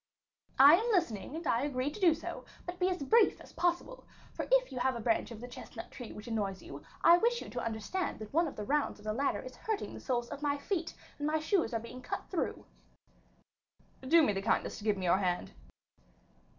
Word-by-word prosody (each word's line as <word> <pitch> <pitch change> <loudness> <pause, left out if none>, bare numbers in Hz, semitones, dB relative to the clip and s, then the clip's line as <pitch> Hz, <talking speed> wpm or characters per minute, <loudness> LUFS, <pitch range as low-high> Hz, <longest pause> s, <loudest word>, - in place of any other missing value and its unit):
"I 285 +5 +9
am 465 +4 0
listening, 295 - 0
and 330 +1 -6
I 235 -3 +2
agree 280 0 -1
to 305 - -9
do 345 -5 +5
so; 325 - -6 0.2
but 355 0 -6
be 365 0 +3
as 360 -6 -2
brief 445 +9 +4
as - - -14
possible, 350 +8 -1 0.3
for - - -4
if - - +4
you 255 - -4
have 260 0 +1
a - - -4
branch 225 0 +1
of 230 -3 -8
the 245 - -7
chestnut 245 - -9
tree 245 -3 -8
which 210 - -9
annoys 205 -4 -2
you, - - -9 0.2
I 345 +1 +8
wish 475 +3 +2
you - - -8
to - - -3
understand 230 - -2
that 215 +2 -9
one 330 +2 +3
of 290 - -7
the 210 - -4
rounds 290 +3 0
of 210 - -16
the 215 - -1
ladder 275 +5 0
is 255 0 -9
hurting 435 -2 -3
the - - -7
soles 240 -2 -1
of 280 - -7
my 290 -1 +1
feet, 330 +2 -3 0.2
and 290 - -1
my 310 +1 +2
shoes 330 +2 +1
are 230 - 0
being 245 +3 -9
cut - - -5
through." 360 - -2 1.4
"Do 315 +5 +5
me 210 - +3
the 195 - -2
kindness 210 - 0
to - - -10
give 210 -2 +2
me 185 - -3
your 180 +2 +4
hand." 180 -2 -1
280 Hz, 230 wpm, -32 LUFS, 225-345 Hz, 1.4 s, I